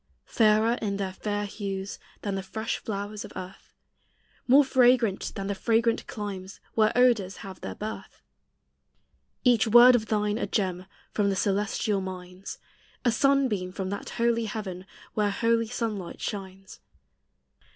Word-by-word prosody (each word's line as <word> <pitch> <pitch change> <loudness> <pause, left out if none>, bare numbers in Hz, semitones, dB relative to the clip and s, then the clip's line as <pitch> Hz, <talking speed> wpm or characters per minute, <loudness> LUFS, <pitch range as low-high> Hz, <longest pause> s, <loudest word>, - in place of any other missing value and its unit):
Fairer 220 +1 +3
in 200 -2 -1
their 190 -2 -3
fair 205 +1 -2
hues 195 -1 -5 0.2
Than 200 - -2
the 195 - -2
fresh 220 +4 -3
flowers 205 0 -5
of - - -10
earth, 185 +1 -9 0.8
More 275 +3 +7
fragrant 245 -6 +3
than 195 - -4
the 200 - -1
fragrant 230 +3 +1
climes 195 -2 -6
Where 215 -1 +3
odors 235 -6 +3
have 190 -1 -9
their - - -5
birth. 215 +1 -7 1.2
Each 240 -3 +4
word 240 +3 +9
of 220 -3 +1
thine 210 0 0
a - - -1
gem 185 -3 -1 0.2
From 205 -2 +1
the 195 - 0
celestial 200 +1 0
mines, 185 0 -7 0.5
A 240 - +5
sunbeam 245 -7 +2
from 190 0 -4
that 200 - -5
holy 230 -1 +2
heaven 195 -4 -5 0.3
Where 210 -1 +1
holy 230 +2 +1
sunlight 215 -6 -4
shines. 195 -1 -6
210 Hz, 140 wpm, -27 LUFS, 195-230 Hz, 1.2 s, word